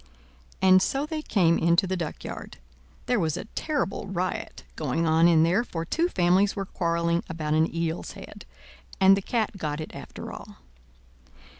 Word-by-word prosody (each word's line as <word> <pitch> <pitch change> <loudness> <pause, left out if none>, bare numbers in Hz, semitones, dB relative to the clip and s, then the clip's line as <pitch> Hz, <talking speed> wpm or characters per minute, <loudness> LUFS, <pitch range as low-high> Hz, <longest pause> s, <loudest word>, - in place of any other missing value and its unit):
And 185 0 +7
so 275 +8 0
they 310 0 -4
came 175 - +2
into 170 +3 +3
the 190 0 -2
duckyard. 165 -4 -6 0.5
There 245 -3 +1
was 160 -4 0
a - - -6
terrible 280 -13 -2
riot, 185 -1 -3
going 155 +2 -1
on 160 +1 +4
in 165 -2 +5
there, 180 +8 +2
for 165 -8 -5
two 330 - +1
families 185 - +2
were 195 - -3
quarreling 170 -2 0
about 155 -2 -2
an 160 +1 +2
eel's 165 0 -3
head, - - -11 0.5
and 195 0 +7
the 195 - -2
cat 215 -1 -1
got 150 -4 -3
it 155 - -7
after - - -8
all. - - -10
175 Hz, 165 wpm, -26 LUFS, 165-195 Hz, 0.5 s, And